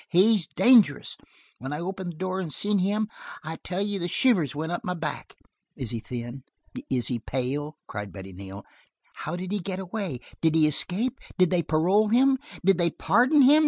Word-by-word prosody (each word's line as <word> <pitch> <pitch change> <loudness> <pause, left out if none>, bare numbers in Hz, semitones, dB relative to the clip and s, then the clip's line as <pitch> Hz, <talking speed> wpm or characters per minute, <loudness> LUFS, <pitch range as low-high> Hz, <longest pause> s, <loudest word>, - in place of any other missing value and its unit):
He's 190 0 +4
dangerous. 230 - +4 0.4
When 130 +4 -6
I 150 - -3
opened 185 +1 -4
the - - -16
door 185 +1 -2
and 175 -5 -4
seen 205 +6 0
him, 205 +3 +1 0.4
I 160 +1 -5
tell 185 +2 -3
you 205 -1 -2
the 175 - -1
shivers 175 - +2
went 160 +3 -3
up 175 - -3
my 180 - -2
back." 155 -4 -5 0.4
"Is 125 -3 -5
he 115 - -3
thin? 120 +3 -6 0.5
Is 125 -2 0
he 120 -2 -1
pale?" 135 +6 -3
cried 105 -2 -6
Betty 95 -1 -9
Neal. 95 +2 -9 0.5
"How 175 - -5
did 185 +1 -5
he 205 - 0
get 185 0 -4
away? 190 - -4 0.2
Did 160 -1 +3
he 160 -1 +5
escape? 200 - +1 0.2
Did 180 -2 +4
they 180 -2 +3
parole 180 +7 +2
him? 260 +4 +4 0.3
Did 195 -2 +4
they 170 -1 +3
pardon 250 - +4
him? 290 +4 +7
175 Hz, 195 wpm, -26 LUFS, 145-205 Hz, 0.5 s, him